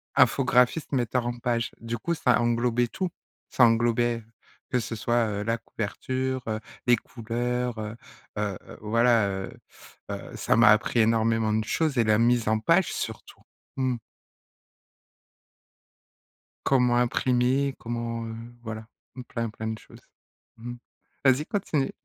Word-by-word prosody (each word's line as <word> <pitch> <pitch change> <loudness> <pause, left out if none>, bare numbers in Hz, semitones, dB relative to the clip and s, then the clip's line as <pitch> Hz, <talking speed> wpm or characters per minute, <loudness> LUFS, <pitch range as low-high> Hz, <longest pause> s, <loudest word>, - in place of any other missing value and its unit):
Infographiste, 125 +3 +3
metteur 125 -2 0
en 120 0 -3
page, 120 -1 -1
du 115 0 -3
coup 170 +9 -2
ça 125 -6 +3
englobait 120 0 +1
tout, 185 +8 -3 0.4
ça 125 - +3
englobait, 120 0 +3 0.5
que 125 - +2
ce 115 +1 -4
soit, 120 +1 +1
heu, 105 -1 -2
la 115 +2 0
couverture, 130 +4 -3
heu, 110 -1 -1 0.3
les 120 - +7
couleurs, 120 +1 -3
heu 110 +1 -5 0.4
heu 105 -3 -1
heu, - - -11
voilà, 115 0 +3
heu 95 0 -4 0.6
heu - - -1 0.2
heu, - - -7
ça - - +1
m'a 115 -2 +7
appris 110 +2 +3
énormément 110 -1 +2
de 110 0 +1
choses 150 +5 0
et 120 - +5
la 110 -1 +3
mise 120 -1 +3
en 110 0 +2
page 165 +11 +3
surtout. 110 -2 -6 0.4
Mmh. 130 -2 +1 2.7
Comment 125 -3 +3
imprimer, 125 +2 +2
comment, 115 0 -3
heu, 115 - -6 0.3
voilà, 110 -1 -6 0.4
plein, 115 -2 -2
plein 110 +1 -6
de 110 0 -3
choses. - - -16 0.6
Mmh 120 +2 -7
mh. - - -10 0.5
Vas-y, 135 +3 +4
continue. 155 -9 -1
120 Hz, 145 wpm, -26 LUFS, 110-125 Hz, 2.7 s, les